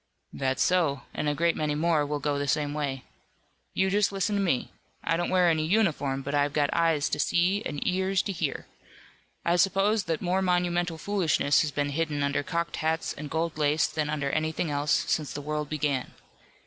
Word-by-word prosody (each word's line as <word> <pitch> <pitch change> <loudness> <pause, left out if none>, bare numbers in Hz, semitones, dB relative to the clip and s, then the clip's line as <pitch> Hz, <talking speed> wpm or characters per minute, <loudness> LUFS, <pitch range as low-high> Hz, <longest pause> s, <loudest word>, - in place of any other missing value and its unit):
"That's 130 -1 0
so, 160 -8 +1
and 150 - -1
a 145 - -1
great 170 +2 +2
many 150 -1 -1
more 155 -1 +2
will 150 0 -1
go 145 0 -1
the 145 - -2
same 145 0 0
way. 140 -3 -3 0.7
You 190 0 +2
just 205 0 +2
listen 200 +1 -1
to 200 - +1
me. 170 -10 0 0.3
I 165 - +1
don't 175 +1 -1
wear 185 -1 +4
any 160 -2 +2
uniform, 155 -8 +1
but 140 +1 -4
I've 145 0 +1
got 145 -1 +1
eyes 165 -3 +2
to - - -2
see 185 +4 +2
and 145 - -4
ears 190 +1 +1
to 200 - -3
hear. 160 -6 -3 0.8
I 170 +1 +3
suppose 195 +3 +2
that 165 -1 -1
more 185 +1 0
monumental 175 -2 0
foolishness 170 -6 +2
has 155 - 0
been 145 0 -1
hidden 150 -1 -1
under 140 0 0
cocked 170 +1 -3
hats 160 +1 -1
and 150 0 -7
gold 160 0 -2
lace 150 +1 +3
than 150 -1 -2
under 140 -2 -1
anything 155 +1 -1
else, 145 +1 -2 0.2
since 150 -3 -1
the - - -4
world 150 0 -3
began. 145 -4 -1
155 Hz, 200 wpm, -27 LUFS, 145-175 Hz, 0.8 s, wear